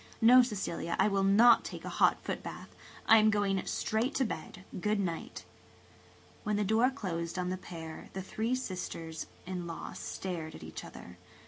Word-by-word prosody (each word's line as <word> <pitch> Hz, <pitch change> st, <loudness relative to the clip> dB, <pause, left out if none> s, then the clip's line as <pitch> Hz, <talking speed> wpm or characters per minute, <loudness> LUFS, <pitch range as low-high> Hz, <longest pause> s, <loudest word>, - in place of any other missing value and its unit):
No, 250 Hz, +2 st, +8 dB
Cecilia, 205 Hz, -7 st, -2 dB
I 195 Hz, -, +4 dB
will 200 Hz, -2 st, +1 dB
not 220 Hz, +5 st, +6 dB
take -, -, -7 dB
a -, -, -3 dB
hot -, -, +6 dB
footbath. -, -, -5 dB, 0.4 s
I 225 Hz, -, +8 dB
am 215 Hz, 0 st, +5 dB
going 200 Hz, -3 st, +1 dB
straight 230 Hz, +6 st, -1 dB
to 265 Hz, -, +2 dB
bed. 180 Hz, -1 st, -6 dB
Good 210 Hz, +2 st, +1 dB
night." 195 Hz, +6 st, -4 dB, 1.0 s
When 210 Hz, 0 st, 0 dB
the 210 Hz, -, +1 dB
door 220 Hz, +5 st, +3 dB
closed 170 Hz, -10 st, -4 dB
on 180 Hz, 0 st, -1 dB
the -, -, 0 dB
pair 165 Hz, -3 st, -8 dB
the 190 Hz, -, -4 dB
three 225 Hz, +6 st, -1 dB
sisters 165 Hz, -8 st, -5 dB, 0.2 s
in 180 Hz, -1 st, -4 dB
laws 165 Hz, -, -7 dB
stared 165 Hz, -4 st, -5 dB
at -, -, -10 dB
each 80 Hz, -, -7 dB
other. -, -, -11 dB
195 Hz, 175 wpm, -31 LUFS, 175-220 Hz, 1.0 s, No